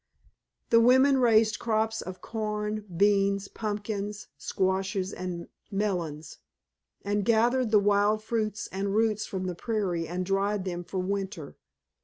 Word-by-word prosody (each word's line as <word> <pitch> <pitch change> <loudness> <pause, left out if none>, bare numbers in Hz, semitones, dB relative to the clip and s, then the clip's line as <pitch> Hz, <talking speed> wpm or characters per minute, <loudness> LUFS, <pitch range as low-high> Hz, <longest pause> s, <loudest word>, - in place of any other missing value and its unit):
The 230 - +7
women 260 +3 +5
raised 225 -2 +4
crops 225 0 0
of 185 0 -8
corn, 210 -1 -3
beans, 200 0 +3
pumpkins, 205 -1 -4
squashes, 190 +3 -1
and 175 -2 -5 0.2
melons, 175 -7 -3 0.7
and 205 0 0
gathered 235 +3 +3
the 215 - +5
wild 205 +1 +3
fruits 215 -2 -2
and 195 +1 -2
roots 215 -1 +1
from 185 -1 -4
the 180 - -2
prairie 180 -4 -2
and 180 +2 -3
dried 195 +1 0
them 175 -1 -3
for 190 - -6
winter. 190 -3 -3
205 Hz, 130 wpm, -28 LUFS, 190-215 Hz, 0.7 s, The